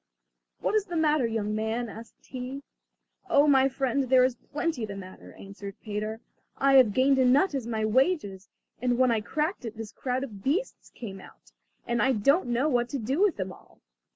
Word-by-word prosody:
"What - - 0
is 430 -2 +2
the 350 -3 -6
matter, 305 -5 +2
young 215 -2 -2
man?" 220 +3 -2
asked 225 +1 -12
he. 260 +2 -6 0.7
"Oh, 290 -3 +5
my 270 -2 +5
friend, 265 0 -1
there 255 -1 +6
is 255 0 +2
plenty 295 0 -3
the 205 -2 -5
matter," 185 -1 -11
answered 200 0 -10
Peter. 215 +1 -4 0.4
"I 275 0 +3
have 250 -5 +6
gained 265 +1 +4
a 260 - +4
nut 285 +8 +4
as 265 -5 -3
my 220 -2 -1
wages, 215 - 0 0.3
and 245 -1 +1
when 255 -1 +4
I 225 -2 +1
cracked 305 - -2
it 225 -2 -7
this 225 -2 -7
crowd 255 0 -3
of 210 -7 -8
beasts 360 - -2
came 195 -5 -9
out, - - -17 0.3
and 235 0 0
I 265 - +3
don't 275 - +2
know 245 +4 +1
what 245 -4 +1
to 280 - -3
do 265 - -1
with 405 -6 +3
them 190 -1 -3
all!" - - -20
250 Hz, 200 wpm, -27 LUFS, 220-275 Hz, 0.7 s, there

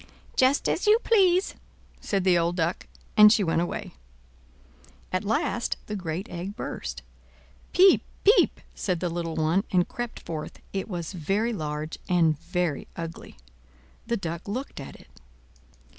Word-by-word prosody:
"Just 260 +2 +3
as 375 - 0
you 425 +1 +7
please," 380 -4 +3 0.5
said 195 -2 -1
the 185 -1 +4
old 170 0 +1
Duck; 170 0 -1 0.3
and 210 0 +9
she 215 -2 +4
went 165 -1 +1
away. 175 - -4 1.2
At 185 - 0
last 225 +3 0
the 210 - -4
great 180 0 -4
egg 180 +4 -6
burst. - - -5 0.7
"Piep! 380 +1 +6 0.2
piep!" 425 +4 +5
said 180 -4 -2
the 175 0 -1
little 165 -1 -3
one, 160 +5 +2
and 180 -2 +2
crept 240 -1 -5
forth, 155 -2 -6 0.2
it 195 -1 -2
was 175 -1 -4
very 195 +8 0
large 155 -3 -4
and 165 -4 +3
very 175 -5 -2
ugly. 165 - -7 0.7
The 235 0 0
Duck 170 -1 -5
looked 250 - -4
at 135 - -8
it. - - -19
180 Hz, 145 wpm, -26 LUFS, 165-220 Hz, 1.2 s, and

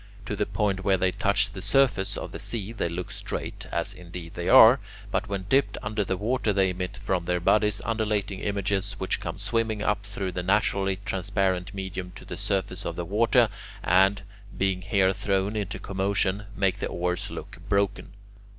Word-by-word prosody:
To 105 - -3
the 105 0 -1
point 100 -3 0
where 95 -1 +3
they 95 +1 +2
touch 100 0 +1
the 95 -2 -7
surface 125 -6 +2
of - - -5
the - - -7
sea 110 -2 -4
they 100 -6 -1
look 90 +2 -5
straight, - - -5
as 85 +4 -1
indeed 90 -2 -9
they - - -3
are, - - +9 0.3
but - - -1
when 100 -2 -2
dipped 135 +6 +2
under 105 0 -1
the 95 -1 -2
water 110 +1 0
they 95 -2 +3
emit 90 +2 -4
from 95 -3 -1
their 90 0 +1
bodies 105 +3 +2
undulating 105 -3 -1
images 100 -1 -1
which 95 - -1
come - - -5
swimming 110 -2 -1
up 105 0 +1
through 100 -2 -3
the 90 - -3
naturally 95 0 +2
transparent 95 0 -1
medium 95 -2 -5
to - - -11
the - - -6
surface 100 0 -1
of - - -3
the 85 - -3
water, 115 +5 +4 0.4
and, 95 +2 +4 0.3
being 95 -1 0
there 95 -3 +4
thrown 100 +2 0
into 105 -2 -2
commotion, 100 +1 0
make 95 -1 +1
the - - -1
oars 90 +1 -2
look - - -8
broken. 100 -1 0
100 Hz, 185 wpm, -27 LUFS, 95-105 Hz, 0.4 s, are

